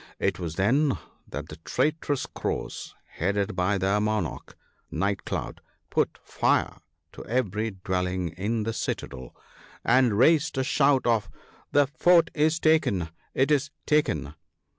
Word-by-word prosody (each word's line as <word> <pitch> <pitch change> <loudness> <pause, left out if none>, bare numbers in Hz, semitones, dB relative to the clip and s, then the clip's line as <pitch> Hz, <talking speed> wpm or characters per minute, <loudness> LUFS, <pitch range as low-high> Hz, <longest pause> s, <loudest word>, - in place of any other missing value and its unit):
It - - 0
was 85 -3 -4
then 130 - +2 0.3
that - - -6
the 75 - -9
traitorous 145 - -1
Crows, - - -4
headed 100 +2 -1
by 90 +3 +1
their 95 +2 +1
monarch, 105 -6 -2 0.3
Night 100 +4 -1
cloud, - - -4 0.3
put - - +1
fire - - +1 0.3
to - - -10
every 110 -3 -1
dwelling 90 -2 -1
in 105 +7 -2
the 115 +1 -2
citadel, 65 - -5 0.5
and 125 -3 +4
raised 155 +3 +4
a 130 - +2
shout 140 0 +3
of 115 -3 +2 0.2
" - - -29
The 145 0 +5
Fort 170 +5 +4
is 155 +1 +2
taken! 130 - +2 0.3
it 135 +3 +2
is 145 0 +2 0.2
taken 150 - +1
110 Hz, 140 wpm, -26 LUFS, 95-145 Hz, 0.5 s, The